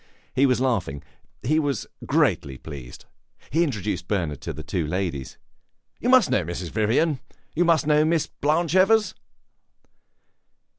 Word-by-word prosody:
He 135 Hz, +2 st, +4 dB
was 125 Hz, -2 st, +2 dB
laughing; 100 Hz, -, -1 dB, 0.4 s
he 155 Hz, +5 st, +2 dB
was 145 Hz, -6 st, -1 dB, 0.2 s
greatly 70 Hz, -2 st, +1 dB
pleased; 70 Hz, -4 st, -10 dB, 0.5 s
he 165 Hz, +5 st, +3 dB
introduced 105 Hz, -, -3 dB
Bernard 85 Hz, -9 st, -2 dB
to -, -, -4 dB
the 80 Hz, -, -8 dB
two 85 Hz, -1 st, -2 dB
ladies. 85 Hz, -6 st, -3 dB, 0.6 s
"You 245 Hz, -, -1 dB
must 255 Hz, -6 st, +5 dB
know 95 Hz, -, +2 dB
Mrs. 85 Hz, 0 st, -5 dB
Vivian; 125 Hz, +7 st, +1 dB, 0.3 s
you 175 Hz, +3 st, +2 dB
must 165 Hz, -2 st, +3 dB
know 150 Hz, 0 st, +4 dB
Miss 160 Hz, 0 st, +2 dB
Blanche 155 Hz, +3 st, 0 dB
Evers." 210 Hz, +3 st, +4 dB
125 Hz, 140 wpm, -24 LUFS, -, 0.6 s, must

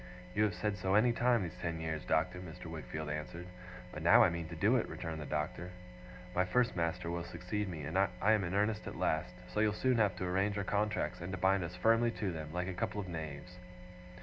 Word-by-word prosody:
'You 105 Hz, +2 st, +3 dB
have 100 Hz, -4 st, -1 dB
said 105 Hz, +2 st, -1 dB
so, 95 Hz, +1 st, +1 dB
any 120 Hz, +3 st, +5 dB
time 120 Hz, -2 st, +3 dB
these 85 Hz, -, -5 dB
ten 85 Hz, -1 st, -2 dB
years, 80 Hz, -1 st, -3 dB
Doctor,' 90 Hz, +3 st, +1 dB
Mr. 90 Hz, 0 st, -9 dB
Wickfield 80 Hz, -1 st, -5 dB
answered. 75 Hz, +3 st, -4 dB, 0.5 s
'But -, -, -6 dB
now -, -, +7 dB
I -, -, +4 dB
mean 85 Hz, -1 st, -4 dB
to -, -, -7 dB
do -, -, +3 dB
it,' -, -, -1 dB
returned 80 Hz, -1 st, -5 dB
the 75 Hz, -, -6 dB
Doctor. 75 Hz, +4 st, -2 dB, 0.6 s
'My 90 Hz, -, +3 dB
first 125 Hz, +7 st, +2 dB
master 85 Hz, 0 st, -1 dB
will 85 Hz, 0 st, -2 dB
succeed 90 Hz, +4 st, -3 dB
me 80 Hz, -5 st, -5 dB
I 95 Hz, +6 st, +2 dB
am 110 Hz, -2 st, +4 dB
in 85 Hz, +2 st, -2 dB
earnest 105 Hz, +1 st, +1 dB
at -, -, -5 dB
last 80 Hz, +2 st, +1 dB, 0.2 s
so -, -, 0 dB
you'll 105 Hz, -1 st, +3 dB
soon 130 Hz, +3 st, +2 dB
have 105 Hz, -4 st, +3 dB
to 90 Hz, -, -3 dB
arrange 95 Hz, +3 st, +1 dB
our 100 Hz, -, 0 dB
contracts, 105 Hz, -1 st, 0 dB
and 90 Hz, +2 st, -4 dB
to -, -, -2 dB
bind 95 Hz, +1 st, +3 dB
us 85 Hz, +1 st, -5 dB
firmly 115 Hz, +5 st, +4 dB
to 100 Hz, -3 st, 0 dB
them, 80 Hz, -2 st, -6 dB
like 90 Hz, +2 st, -2 dB
a 95 Hz, -, -2 dB
couple 90 Hz, +3 st, -2 dB
of 100 Hz, -, -4 dB
knaves. 80 Hz, +1 st, -6 dB
90 Hz, 230 wpm, -34 LUFS, 80-105 Hz, 0.6 s, now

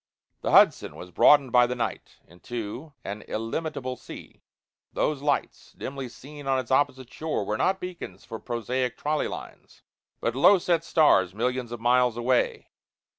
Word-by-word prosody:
The -, -, -2 dB
Hudson -, -, +5 dB
was 90 Hz, -, -10 dB
broadened 135 Hz, -, +5 dB
by 125 Hz, 0 st, +5 dB
the 125 Hz, -, -3 dB
night 115 Hz, -2 st, -4 dB
into 120 Hz, -, -7 dB
an 100 Hz, +2 st, -6 dB
illimitable 130 Hz, +3 st, -3 dB
sea -, -, -12 dB, 0.5 s
those 150 Hz, -3 st, 0 dB
lights, 145 Hz, -1 st, -2 dB
dimly 135 Hz, -2 st, -6 dB
seen 145 Hz, +3 st, -11 dB
on 135 Hz, -1 st, +2 dB
its 130 Hz, -1 st, -4 dB
opposite 130 Hz, -2 st, +1 dB
shore, 155 Hz, -10 st, -2 dB
were 105 Hz, -, -1 dB
not 190 Hz, -, +1 dB
beacons 175 Hz, -, -8 dB
for 110 Hz, -, -7 dB
prosaic 125 Hz, +1 st, -2 dB
trolley 150 Hz, +1 st, -1 dB
lines, -, -, -10 dB, 0.4 s
but 115 Hz, +1 st, -1 dB
low 190 Hz, +9 st, +6 dB
set 170 Hz, -2 st, 0 dB
stars 100 Hz, -, +3 dB
millions 125 Hz, +1 st, -2 dB
of 120 Hz, -, -5 dB
miles 125 Hz, 0 st, +3 dB
away. 120 Hz, +1 st, 0 dB
125 Hz, 155 wpm, -26 LUFS, 115-145 Hz, 0.5 s, low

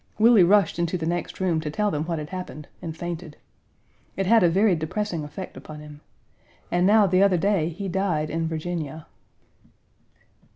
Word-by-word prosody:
Willie 225 Hz, -1 st, +6 dB
rushed 200 Hz, +1 st, +3 dB
into 170 Hz, +1 st, 0 dB
the 160 Hz, -, -4 dB
next 175 Hz, +1 st, -3 dB
room 175 Hz, -4 st, +1 dB
to 155 Hz, -, -4 dB
tell 210 Hz, +7 st, 0 dB
them 150 Hz, +1 st, -2 dB
what 165 Hz, -1 st, -2 dB
had 150 Hz, 0 st, -6 dB
happened, 180 Hz, -5 st, -7 dB
and 165 Hz, -2 st, -6 dB
fainted. 170 Hz, -2 st, -6 dB, 0.8 s
It 195 Hz, -, 0 dB
had 225 Hz, +4 st, +5 dB
a 175 Hz, -, +5 dB
very 195 Hz, +2 st, +3 dB
depressing 170 Hz, +1 st, -3 dB
effect 150 Hz, +6 st, -8 dB
upon 155 Hz, -1 st, -10 dB
him. 150 Hz, -1 st, -12 dB, 0.7 s
And 175 Hz, +1 st, +3 dB
now 210 Hz, 0 st, +6 dB
the 185 Hz, 0 st, +3 dB
other 195 Hz, -2 st, +4 dB
day 190 Hz, -3 st, +1 dB
he 195 Hz, +4 st, -6 dB
died 175 Hz, -5 st, -1 dB
in 165 Hz, +1 st, -1 dB
Virginia. 160 Hz, -1 st, -4 dB
175 Hz, 175 wpm, -24 LUFS, 160-195 Hz, 0.8 s, Willie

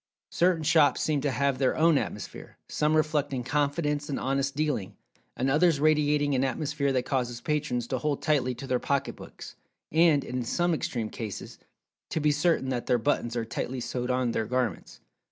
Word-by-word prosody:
Certain 175 Hz, -2 st, +2 dB
shops 155 Hz, -1 st, +4 dB
seem 150 Hz, -3 st, 0 dB
to 145 Hz, -, 0 dB
have 135 Hz, +1 st, 0 dB
their 130 Hz, -2 st, +1 dB
own 165 Hz, 0 st, +4 dB
atmosphere—some 150 Hz, +8 st, -3 dB
reflecting 145 Hz, -4 st, 0 dB
confidence 145 Hz, +2 st, -1 dB
and 140 Hz, -, -2 dB
honest 135 Hz, +1 st, -1 dB
dealing, 145 Hz, -10 st, -1 dB, 0.4 s
and 130 Hz, -, 0 dB
others 155 Hz, +2 st, +3 dB
radiating 150 Hz, -1 st, +2 dB
an 130 Hz, 0 st, +2 dB
atmosphere 140 Hz, +1 st, -1 dB
that 130 Hz, -1 st, 0 dB
causes 125 Hz, -3 st, -1 dB
patrons 130 Hz, -6 st, -1 dB
to 130 Hz, +1 st, -2 dB
hold 145 Hz, +1 st, -1 dB
tightly 130 Hz, -5 st, +1 dB
to 125 Hz, -, -8 dB
their 125 Hz, -2 st, 0 dB
pocketbooks, 140 Hz, +1 st, -4 dB, 0.4 s
and, 160 Hz, -3 st, +4 dB
in 125 Hz, 0 st, -3 dB
some 175 Hz, +8 st, 0 dB
extreme 115 Hz, -8 st, -3 dB
cases, 110 Hz, -4 st, -7 dB, 0.5 s
to -, -, -1 dB
be 150 Hz, 0 st, +3 dB
certain 150 Hz, -2 st, +1 dB
that 125 Hz, -2 st, -3 dB
their 125 Hz, -, +3 dB
buttons 120 Hz, -1 st, -1 dB
are 115 Hz, -1 st, -1 dB
tightly 120 Hz, +2 st, -4 dB
sewed 125 Hz, +1 st, -3 dB
on 125 Hz, -1 st, +1 dB
their 110 Hz, -1 st, -1 dB
garments. 125 Hz, -6 st, -2 dB
140 Hz, 170 wpm, -27 LUFS, 125-150 Hz, 0.5 s, shops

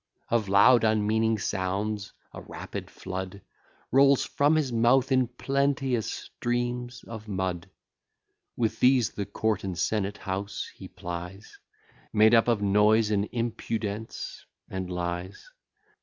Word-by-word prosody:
Of 110 Hz, -4 st, +1 dB
loud 115 Hz, +5 st, +6 dB
unmeaning 110 Hz, +1 st, +2 dB
sounds, 100 Hz, +2 st, -2 dB, 0.2 s
a -, -, -8 dB
rapid -, -, -7 dB
flood 95 Hz, +1 st, -6 dB, 0.5 s
Rolls 135 Hz, +1 st, +5 dB
from 145 Hz, +2 st, +2 dB
his 150 Hz, -5 st, +1 dB
mouth 120 Hz, +3 st, +3 dB
in 130 Hz, -2 st, +3 dB
plenteous 135 Hz, -1 st, 0 dB
streams 120 Hz, 0 st, -3 dB
of 110 Hz, -2 st, -9 dB
mud; 95 Hz, -4 st, -3 dB, 0.9 s
With 115 Hz, -2 st, 0 dB
these 125 Hz, -4 st, +4 dB
the 100 Hz, -2 st, -4 dB
court 110 Hz, 0 st, -1 dB
and 95 Hz, -3 st, -4 dB
senate 105 Hz, +1 st, -1 dB
house 100 Hz, 0 st, -4 dB
he -, -, -10 dB
plies, 90 Hz, +4 st, -8 dB, 0.5 s
Made 110 Hz, +1 st, +5 dB
up 115 Hz, 0 st, +5 dB
of 115 Hz, -4 st, +2 dB
noise, 105 Hz, +2 st, +4 dB
and 100 Hz, 0 st, 0 dB
impudence, 110 Hz, -2 st, -4 dB, 0.2 s
and 95 Hz, -1 st, -5 dB
lies. 90 Hz, -, -5 dB
110 Hz, 125 wpm, -27 LUFS, 100-120 Hz, 0.9 s, loud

